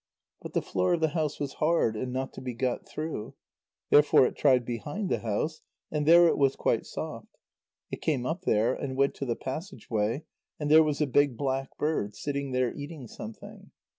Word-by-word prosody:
But - - -8
the - - 0
floor 90 - +1
of - - -4
the 160 -1 +2
house 150 -1 -2
was 140 -1 -3
hard, 155 -8 +2
and 125 +3 -3
not 130 +1 -3
to - - -9
be 125 -2 -5
got 125 +1 -2
through. 155 -8 -5 0.6
Therefore 145 -3 +6
it - - -2
tried 130 -4 +3
behind 145 - -4
the - - +1
house, 120 +9 -2 0.3
and 150 -1 -1
there 170 +1 +8
it - - +1
was 135 -1 +3
quite - - 0
soft. - - -7 0.5
It - - -5
came 135 -6 0
up 165 +6 -2
there, 115 - +2
and 130 -1 -4
went 140 0 +3
to 140 - -3
the 120 - 0
passage 160 +8 -7
way, 110 +6 0 0.4
and 150 -1 -1
there 160 +1 +9
was 150 -2 0
a - - +4
big 140 -2 +2
black 135 0 -2
bird, 125 -10 -1
sitting 140 0 -3
there 125 -2 +1
eating 145 -3 -8
something. 110 0 -10
140 Hz, 200 wpm, -28 LUFS, 125-155 Hz, 0.6 s, there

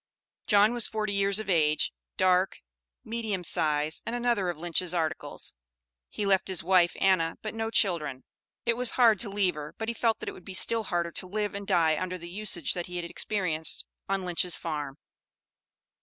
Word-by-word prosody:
John 210 +2 +5
was 240 -2 +1
forty 215 -1 -2
years 200 0 +2
of 220 -2 -3
age, 155 -5 +2 0.2
dark, 185 0 +3 0.5
medium 220 -5 -3
size, 155 -2 +1
and 230 - -4
another 235 -6 0
of 175 - -4
Lynch's 175 +2 0
"articles." 160 -2 -3 0.6
He 205 - -3
left 195 -1 +2
his 185 -4 +1
wife 180 -1 +3
Anna, 175 -4 +2
but 215 - -4
no 225 0 -2
children; 155 - +1 0.4
it 235 -1 +2
was 250 0 +1
hard 230 -4 +5
to 225 - -1
leave 195 -2 +1
her, 150 +1 -8
but 225 0 -3
he - - -1
felt 230 -1 +1
that - - -7
it - - -2
would 180 - -13
be 190 - -7
still 225 +3 +4
harder 170 -2 -1
to 185 - -3
live 210 +2 -2
and 200 0 -6
die 165 -4 +2
under 185 0 -3
the 170 0 -9
usage 190 -5 +2
that 175 -1 -4
he 180 - -8
had 175 -1 -3
experienced 170 -3 -1 0.2
on 195 -1 -1
Lynch's 180 0 +1
farm. 150 -4 -4
185 Hz, 190 wpm, -28 LUFS, 170-210 Hz, 0.6 s, John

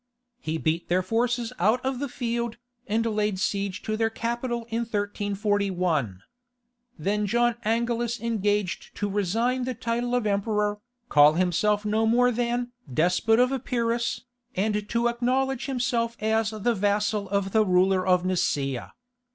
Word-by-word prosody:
He 160 -8 -3
beat 160 +1 -1
their 185 +1 +2
forces 235 +3 0
out 215 +7 +3
of 265 -1 -1
the 285 0 -3
field, 235 -2 -3 0.3
and 225 +2 0
laid 210 -3 0
siege 200 0 -2
to 215 - -2
their 225 0 +1
capital 235 +1 -3
in 225 - 0
1341. 200 - -1 0.7
Then 205 +5 0
John 240 +3 +2
Angelus 235 +1 0
engaged 210 -4 -1
to 205 - -2
resign 225 +6 0
the 255 -1 -3
title 240 +1 -1
of 245 -3 0
emperor, 210 0 0 0.3
call 150 -4 +6
himself 185 +5 +1
no 220 +1 +1
more 245 +2 +4
than 240 +1 -1 0.2
"despot 180 - +2
of 250 +1 +4
Epirus," 235 -2 -1 0.3
and 210 +1 -1
to 235 0 +1
acknowledge 255 +2 0
himself 240 -3 -1
as 220 0 +1
the 220 +2 0
vassal 205 0 0
of 200 -1 0
the 220 +1 +4
ruler 185 0 +3
of 180 -1 +3
Nicaea. 140 -8 -1
215 Hz, 145 wpm, -26 LUFS, 200-235 Hz, 0.7 s, call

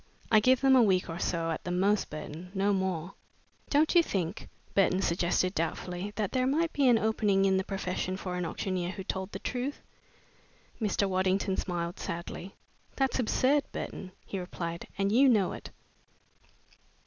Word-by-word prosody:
I 215 - +7
give 255 +4 +4
them 270 -1 +6
a 255 - +7
week 185 -6 +2
or 165 - -5
so 165 -3 -1
at 160 - -4
the - - -5
most, 195 +4 +1
Burton 155 +3 -7
no 200 +1 +2
more." 190 -2 -2 0.6
"Don't 300 +2 +3
you 345 - +7
think," 190 - -3 0.2
Burton 190 -1 +3
suggested 175 +1 +1
doubtfully, 180 +3 -3
"that 205 -2 -1
there 255 -1 +1
might 325 +4 +1
be 280 -2 +3
an 240 -2 +6
opening 210 -3 +2
in 190 -1 +3
the 190 - 0
profession 185 -1 -3
for 180 -1 -4
an 180 - -2
auctioneer 180 +1 -2
who 190 - -6
told 190 +1 -4
the - - -4
truth?" 255 +3 -4 1.0
Mr. 205 -1 +1
Waddington 190 +1 +1
smiled 175 -2 -3
sadly. 170 +3 -6 0.4
"That's 270 -1 0
absurd, 265 +4 +2
Burton," 185 - -6
he 195 - -4
replied, 170 -2 -5
"and 195 0 +1
you 265 +5 +6
know 210 -6 +3
it." - - -8
190 Hz, 170 wpm, -30 LUFS, 180-220 Hz, 1.0 s, I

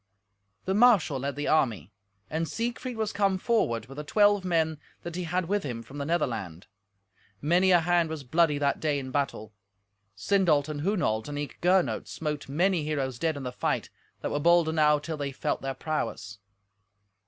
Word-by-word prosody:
The 190 - 0
marshal 205 - +4
led 140 +2 -3
the 145 - -3
army, 110 - +1 0.4
and 160 +1 -2
Siegfried 240 +1 -3
was 220 -1 -2
come 195 -2 +2
forward 150 - 0
with 135 +3 -12
the 150 - -4
twelve 205 +4 +3
men 160 -4 0 0.2
that 175 -1 -6
he 180 0 -3
had 180 +2 -1
with 205 +2 +1
him 120 -7 -5
from 140 +5 -10
the 140 - -3
Netherland. 115 - -2 0.7
Many 175 +5 +3
a 175 -2 +6
hand 170 -1 +2
was 160 -3 -5
bloody 155 +3 +2
that 140 -1 0
day 150 -2 0
in 135 - -4
the 130 - -7
battle. 120 -6 -2 0.6
Sindolt 155 - +2
and 150 -2 -4
Hunolt 165 - 0
and 145 0 -5
eke 145 0 -6
Gernot 180 +1 +2
smote 150 -3 -4
many 175 +3 +1
heroes 135 -5 -2
dead 160 -3 0
in 140 - -6
the 125 - -4
fight, - - -2 0.3
that - - -3
were 145 - 0
bold 170 +1 +4
enow 155 -2 +3
till 155 +2 -5
they 140 -1 -3
felt 135 - -2
their 135 0 -3
prowess. 115 -9 -4
155 Hz, 190 wpm, -28 LUFS, 140-180 Hz, 0.7 s, a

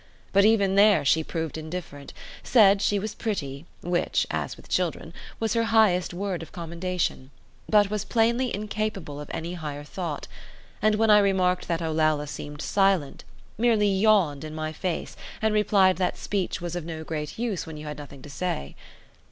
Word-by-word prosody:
But 200 +1 +5
even 205 -3 +4
there 200 -4 +5
she 160 +3 +3
proved 160 -1 -4
indifferent; 155 -3 -7 0.3
said 200 -5 +5
she 205 - +2
was 210 +2 -3
pretty, 155 -9 -4
which 175 0 0
(as - - -3
with - - -15
children) - - -1 0.3
was 225 -2 0
her 230 0 +2
highest 220 -6 +3
word 185 0 -3
of 165 - -10
commendation, 170 -4 -3 0.4
but 205 -2 +4
was 210 -1 -1
plainly 235 +3 +1
incapable 205 -7 -3
of 150 - -9
any 170 +2 -4
higher 150 -4 -6
thought; 160 -1 -5 0.5
and 215 +1 +3
when 220 0 +3
I 210 - +8
remarked 185 -2 +2
that 170 0 -1
Olalla 155 -2 +1
seemed 145 0 -7
silent, 195 -8 +1 0.3
merely 220 -3 +3
yawned 190 -8 +3
in 155 0 -7
my 155 0 -3
face 175 +1 -3 0.2
and 220 -1 +1
replied 200 -3 +4
that 180 -1 0
speech 195 -3 -2
was 175 0 -4
of 175 - -3
no 160 -1 -6
great 150 -2 -5
use 225 -8 -2
when 160 -1 -7
you 150 - -8
had 150 -1 -6
nothing 140 -2 -11
to - - -10
say. 140 - -3
180 Hz, 175 wpm, -26 LUFS, 155-210 Hz, 0.5 s, I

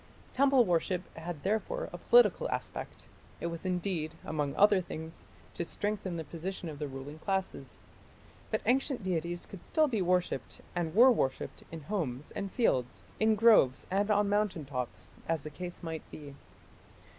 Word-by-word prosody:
Temple 270 -2 +5
worship 180 0 +1
had 165 -2 -6
therefore 220 - -1
a - - -6
political 485 0 +5
aspect; - - -5 0.3
it - - -4
was 170 +3 -5
intended, 180 -3 -1
among 150 -2 -2
other 205 -1 +5
things, 160 -1 -8 0.3
to - - -2
strengthen 195 -1 -3
the 165 - -3
position 170 +3 -5
of 145 -2 -8
the 150 - -2
ruling 135 +3 -8
classes. 190 +1 -3 0.7
But - - -1
ancient 265 -2 +1
deities 175 -1 -2
could 195 - -11
still 310 -1 +2
be 225 -7 0
worshipped, 180 -7 0 0.2
and 170 -1 -2
were 250 +4 +8
worshipped, 135 - -1
in 165 -1 -6
homes 150 -7 -3
and 200 -1 -4
fields, 130 - +1 0.2
in 220 0 +4
groves 210 - +5
and 200 +2 +1
on 205 -1 +3
mountain 205 -6 0
tops, 125 -9 -5 0.2
as 165 -3 0
the 155 - -6
case 175 +4 -7
might 160 -1 -4
be. 145 -2 -9
175 Hz, 160 wpm, -31 LUFS, 155-205 Hz, 0.7 s, were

